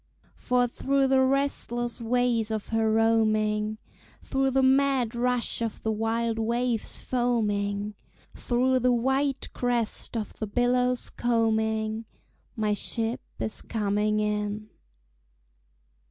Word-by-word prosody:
For 250 0 +1
through 270 +2 +1
the 265 0 +4
restless 260 -3 0
ways 235 -1 +1
of 220 -2 -3
her 225 -1 +1
roaming, 215 -1 +2 0.5
Through 270 0 +1
the 265 0 +2
mad 265 -3 +3
rush 245 0 0
of 230 -2 -3
the 220 - 0
wild 225 +1 -1
waves 235 0 -1
foaming, 210 -4 -1 0.4
Through 255 +1 +1
the 250 0 +3
white 265 +3 0
crest 240 -1 -1
of 215 - -4
the 220 - -2
billows 250 +3 +1
combing, 220 -1 0 0.5
My 215 -2 0
ship 225 +3 -2 0.2
is 220 - -4
coming 210 -1 0
in. 210 0 -2
230 Hz, 110 wpm, -27 LUFS, 215-250 Hz, 0.5 s, the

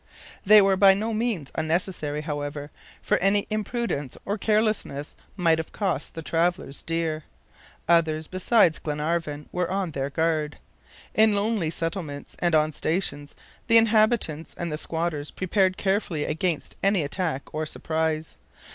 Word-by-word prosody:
They 210 +1 +8
were 195 -1 +3
by 195 0 +7
no 220 +3 -2
means 215 - -2
unnecessary, 160 -2 -1
however, 145 -1 -5 0.3
for - - +2
any 195 +2 +3
imprudence 215 - -2
or 200 - -1
carelessness 215 -9 0 0.2
might 165 -3 +3
have 160 - -5
cost 185 -8 -2
the 165 - -6
travelers 165 -3 -1
dear. 165 -2 -2 0.6
Others 160 -2 +3
beside 185 -1 +2
Glenarvan 150 0 -2
were 180 -1 -1
on 190 -2 -1
their 140 -1 -2
guard. 155 0 0 0.6
In 215 -1 +4
lonely 205 -5 0
settlements 165 -3 -4
and 175 -2 +2
on 155 0 +3
stations, 145 -3 -2 0.3
the 230 -1 +7
inhabitants 215 -8 +2
and 170 -2 -3
the 150 - -2
squatters 160 -3 -2
prepared 185 0 +1
carefully 190 -6 0
against 165 0 -2
any 195 -4 +3
attack 145 -1 -3
or 155 0 -2
surprise. 160 0 -2
165 Hz, 140 wpm, -25 LUFS, 155-195 Hz, 0.6 s, They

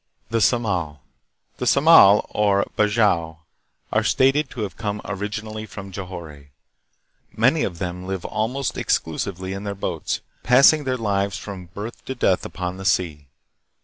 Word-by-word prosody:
The 115 - +1
Samal. 95 - 0 0.6
The - - -3
Samal, 140 -9 +7
or 100 -1 +2
Bajau, 105 -7 +2 0.6
are - - +2
stated 135 +2 +2
to 125 - -7
have 100 -5 -4
come 105 -1 -3
originally 110 +2 -5
from 100 -1 -9
Johore. 85 -7 -8 0.9
Many 130 +8 +3
of 90 -4 -3
them 90 0 -5
live 95 -2 -4
almost 120 +5 -2
exclusively 95 +3 -2
in 100 +1 -6
their 100 -1 -4
boats, 100 - -3 0.2
passing 140 +4 +5
their 130 -1 0
lives 100 -3 -1
from 95 -3 -8
birth 105 +7 -8
to 130 - -4
death 95 -7 +1
upon 90 0 -5
the 95 - -8
sea. 80 -7 0
100 Hz, 145 wpm, -22 LUFS, 90-110 Hz, 0.9 s, Samal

